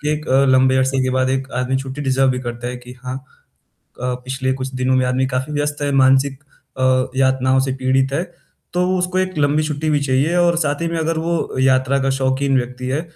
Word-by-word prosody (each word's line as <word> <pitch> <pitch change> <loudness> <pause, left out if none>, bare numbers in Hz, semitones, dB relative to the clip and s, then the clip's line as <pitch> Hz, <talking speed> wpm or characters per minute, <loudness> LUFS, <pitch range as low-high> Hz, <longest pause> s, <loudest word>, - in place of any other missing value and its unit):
कि 150 - -2
एक 150 0 -4 0.2
लम्बे 130 0 +4
अरसे 130 +1 +1
के 130 - 0
बाद 130 0 +1
एक 135 0 -2
आदमी 125 +1 0
छुट्टी 135 +1 -6
डिजर्व 135 -1 +2
भी 125 - -1
करता 120 -1 -6
है 125 - -5
कि 125 0 -12
हाँ, 130 0 -4 0.8
क 125 0 -2
पिछले 130 0 -2
कुछ 130 0 -4
दिनों 130 0 +1
में 130 0 +2
आदमी 130 +1 +1
काफ़ी 130 +3 -3
व्यस्त 145 0 -2
है, 145 0 0
मानसिक 135 0 +3 0.4
अ, 130 0 +2
यातनाओं 130 0 +2
से 130 0 0
पीड़ित 130 0 +1
है। 160 +5 0 0.5
तो 180 0 +1
उसको 180 +1 -1
एक 185 -2 -2
लंबी 150 +1 +2
छुट्टी 155 0 -2
भी 150 -1 +2
चाहिए 140 +5 +1
और 175 -1 +3
साथ 145 -2 -1
ही 170 - 0
में 165 0 -3
अगर 160 0 -1
वो 165 -4 -2
यात्रा 130 +1 +3
का 135 - +1
शौकीन 135 +1 +1
व्यक्ति 125 0 -4
है 140 +5 -1
135 Hz, 220 wpm, -19 LUFS, 130-145 Hz, 0.8 s, लम्बे